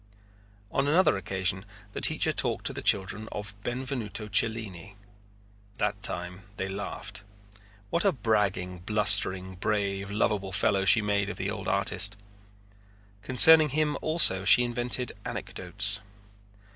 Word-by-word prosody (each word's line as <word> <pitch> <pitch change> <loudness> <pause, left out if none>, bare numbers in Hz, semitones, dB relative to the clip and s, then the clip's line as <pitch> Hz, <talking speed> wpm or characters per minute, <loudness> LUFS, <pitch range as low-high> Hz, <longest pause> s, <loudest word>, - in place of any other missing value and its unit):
On 135 +1 -1
another 170 - +3
occasion 95 0 -2 0.3
the - - -6
teacher - - +2
talked - - -1
to - - -2
the - - -6
children 105 +2 0
of 105 0 -6
Benvenuto 120 -4 -4
Cellini. 105 -5 -2 0.8
That 105 -1 -2
time 90 +3 -3
they 95 - -4
laughed. 100 +1 -6 0.7
What 170 - 0
a 200 - +3
bragging, 100 - -1
blustering, 95 -2 +3
brave, 100 0 -2
lovable 100 -2 -2
fellow 100 -1 +1
she 110 +2 +6
made 100 -1 -1
of - - -7
the - - -3
old - - -7
artist! 100 0 -1 1.0
Concerning 150 +7 +7
him 150 +1 -1
also 155 - +3
she 100 +5 +5
invented 120 0 -3
anecdotes. 100 +3 -4
105 Hz, 125 wpm, -27 LUFS, 95-115 Hz, 1.0 s, Concerning